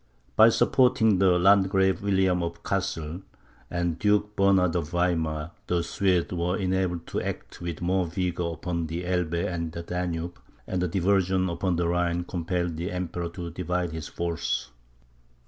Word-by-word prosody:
By 110 +1 +8
supporting 110 -4 +3
the 95 -2 +5
Landgrave 95 0 +4
William 95 -3 +2
of 85 0 -5
Cassel, 90 -3 -2 0.5
and 85 -2 -1
Duke 105 0 +2
Bernard 95 -3 +3
of 85 -4 -1
Weimar, 85 -3 0 0.2
the 85 -1 +1
Swedes 95 -2 +1
were 90 +1 0
enabled 95 -3 -1
to - - -3
act - - -6
with 85 -1 -4
more 90 0 +1
vigour 90 -1 -2
upon 85 0 -3
the 85 +3 -4
Elbe 90 -2 0
and 85 -2 -3
the 85 +1 -6
Danube, 90 -1 -3 0.3
and 95 - -2
a 90 - +1
diversion 95 +1 +2
upon 90 +1 0
the 85 0 0
Rhine 85 0 0
compelled 85 -1 -2
the 90 +4 -3
Emperor 90 -1 -3
to 85 -1 -6
divide 90 0 -2
his 80 -2 -5
force. 85 -1 -2
90 Hz, 155 wpm, -26 LUFS, 85-95 Hz, 0.5 s, By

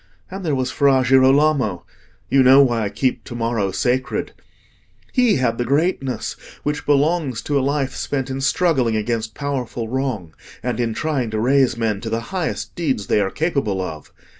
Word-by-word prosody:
And 190 +1 -6
there 155 -5 0
was 130 -1 -1
Fra 135 -3 +3
Girolamo—you 135 - +2
know 135 +2 +7
why 120 -4 +1
I - - -1
keep 130 +4 -1
to 120 - -8
morrow 115 -4 -1
sacred: 125 +7 -1 0.8
he 250 -4 +4
had 125 -3 0
the - - +2
greatness 140 0 -1 0.3
which 150 0 -3
belongs 145 -3 +2
to 145 -1 +1
a - - 0
life 135 0 -1
spent 135 -2 -3
in 135 +1 -3
struggling 135 -4 +2
against 110 0 -2
powerful 125 -5 -3
wrong, 120 -10 -3 0.3
and 125 -2 -2
in 115 -2 -1
trying 140 -6 -1
to 110 0 -2
raise 130 +1 +3
men 110 -3 -1
to 115 - -4
the 115 +1 -1
highest 180 -4 -3
deeds 135 -12 -1
they 105 - +2
are 95 - 0
capable 140 - -1
of. 80 -5 -6
130 Hz, 170 wpm, -20 LUFS, 115-140 Hz, 0.8 s, know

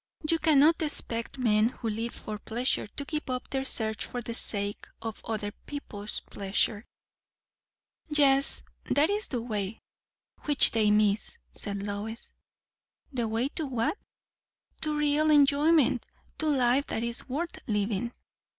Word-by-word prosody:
"You 330 +1 +3
cannot 310 +1 +5
expect 235 -6 -2
men 220 -3 +3
who 240 - -6
live 225 +2 -3
for 210 -1 -6
pleasure 240 +2 0
to 280 +7 -6
give 300 -1 -4
up 255 0 -4
their 270 -1 0
search 220 -4 -1
for 245 - -5
the 235 -1 -5
sake 205 -3 +2
of 225 -1 -6
other 210 -2 -3 0.2
people's 210 -8 -3
pleasure." 205 +3 -1 1.2
"Yet 280 -3 +4 0.2
that 300 +6 +2
is 415 +1 0
the 245 -4 -3
way, 210 -3 -3 0.7
which 290 -3 +5
they 220 -2 +3
miss," 210 0 +2 0.2
said 200 -1 -2
Lois. 210 +3 -5 0.8
"The 240 -3 -1
way 225 +5 0
to 310 0 -3
what?" 245 - 0 0.9
"To 305 -1 0
real 300 +1 +2
enjoyment. 290 -2 +4 0.4
To 315 - 0
life 265 -1 +3
that 225 - -2
is 235 +2 -4
worth 335 +6 -3
living." 210 +1 -1
240 Hz, 140 wpm, -28 LUFS, 215-290 Hz, 1.2 s, cannot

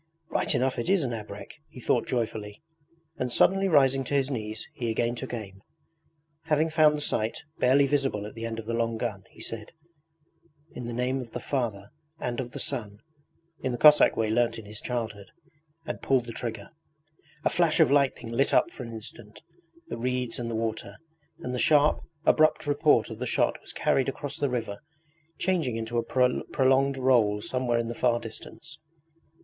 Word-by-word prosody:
'Right - - +1
enough 130 0 0
it 120 - -2
is 195 -4 +3
an 120 -3 -2
abrek! 105 +6 -8
he - - -12
thought 120 -1 +1
joyfully, 110 -2 -3 0.6
and 125 -1 -1
suddenly 195 +8 +4
rising 135 -5 +4
to 140 - -2
his 135 0 +1
knees 110 -3 -4
he 120 -2 -3
again 115 +1 0
took 130 +2 -6
aim. 100 -5 -7 0.8
Having 155 0 +2
found 155 -1 +5
the - - -5
sight, 110 -6 -1 0.2
barely 135 +3 +5
visible 135 -7 0
at 105 - -8
the 115 - -8
end 115 -1 -5
of 115 - -6
the 115 - -3
long 115 -1 0
gun, 105 -5 -4
he - - -19
said: 110 +3 -6 1.0
'In 125 -1 -6
the - - -4
name 125 +2 -1
of 120 - -9
the - - -3
Father 110 -8 -3 0.3
and 120 0 -3
of 125 -2 -3
the - - -8
Son,' 105 -4 -3 0.6
in 130 - -1
the - - -2
Cossack 150 +3 +7
way 110 -1 +1
learnt 120 +1 +2
in 110 - -9
his 105 +1 -8
childhood, 110 -5 -4 0.6
and 155 - -5
pulled 130 -3 +2
the 115 - -7
trigger. 110 -4 -5 0.7
A - - +5
flash 170 -3 +2
of - - +5
lightning 140 -4 +2
lit 135 +4 +2
up - - +3
for - - -10
an 115 -2 -7
instant 105 -1 -10 0.5
the - - -4
reeds 125 -1 -2
and 120 -1 -3
the 115 - -3
water, 110 -2 -3 0.5
and 125 - -4
the 125 - -2
sharp, 150 +1 +4 0.3
abrupt 155 0 +4
report 145 -5 +3
of 110 - -7
the 125 - -2
shot - - +1
was - - -9
carried 135 0 +1
across 140 +1 -5
the 145 - 0
river, 115 -5 -3 0.6
changing 170 -10 0
into 115 +1 -2
a - - -1 0.4
prolonged 135 +1 +2
roll 120 -6 +3
somewhere 125 +2 -1
in 115 0 -1
the 120 - -3
far 120 0 +2
distance. 135 +6 -10
120 Hz, 190 wpm, -27 LUFS, 115-135 Hz, 1.0 s, Cossack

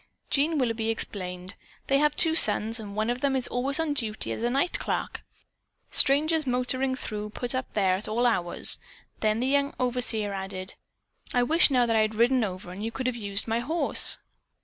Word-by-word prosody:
Jean 300 +3 +2
Willoughby 230 -4 -1
explained: 185 -4 -4 0.3
"They 275 0 +2
have 295 0 +2
two 325 -2 +4
sons, 225 -5 +4
and 205 -2 -8
one 215 +2 0
of 245 +1 -5
them 275 -1 +1
is 255 -2 0
always 270 +4 -1
on 320 -2 0
duty 220 -6 -3
as - - -5
night 270 +8 0
clerk. - - -3 0.7
Strangers 310 +2 +4
motoring 255 +1 -1
through 210 -4 -5
put 240 +3 -3
up 255 0 -4
there 190 -3 +2
at 200 - -5
all 235 +3 0
hours." 180 -8 +3 0.4
Then 215 +1 0
the - - 0
young 280 +1 +1
overseer 240 -5 +1
added: 190 -1 -5 0.6
"I 245 - +3
wish 320 +7 +4
now 250 -3 +3
that 230 -1 0
I - - +4
had 215 0 -1
ridden 245 +2 +3
over 185 -3 -6
and 195 +3 -7
you 225 - -3
could 260 +2 -5
have 255 -1 -1
used 200 -2 -1
my 225 +1 0
horse." 315 +8 +1
240 Hz, 195 wpm, -26 LUFS, 215-270 Hz, 0.7 s, two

